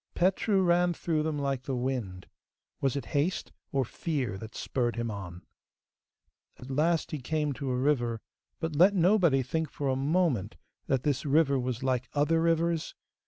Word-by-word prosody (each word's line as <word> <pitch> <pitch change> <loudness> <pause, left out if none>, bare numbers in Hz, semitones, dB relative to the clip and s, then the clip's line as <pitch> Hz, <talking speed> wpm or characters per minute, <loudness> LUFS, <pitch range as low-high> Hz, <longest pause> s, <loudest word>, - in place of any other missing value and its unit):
Petru 190 +2 +2
ran 175 0 +3
through 160 -2 0
them 155 -1 -1
like 140 -2 -1
the 135 0 -3
wind. 120 -8 -3 0.5
Was 135 0 0
it 140 -4 -3
haste 150 +6 0 0.2
or 135 -2 +1
fear 135 - -3
that 110 +1 -9
spurred 120 -3 -1
him 115 -1 -2
on? 90 -4 -7 1.1
At 130 +2 -9
last 160 +4 +1
he 155 - -3
came 150 +2 -1
to 135 0 -4
a 125 - 0
river, 125 -4 +1 0.4
but 160 -2 -3
let 185 +6 +6
nobody 175 -7 +4
think 160 +5 -2
for 140 -2 -3
a 130 - +1
moment 135 - 0 0.3
that 130 -2 +1
this 145 -4 0
river 140 -1 +3
was 125 -1 -3
like 130 -2 0
other 155 +3 +2
rivers? 165 0 +1
140 Hz, 165 wpm, -29 LUFS, 125-165 Hz, 1.1 s, let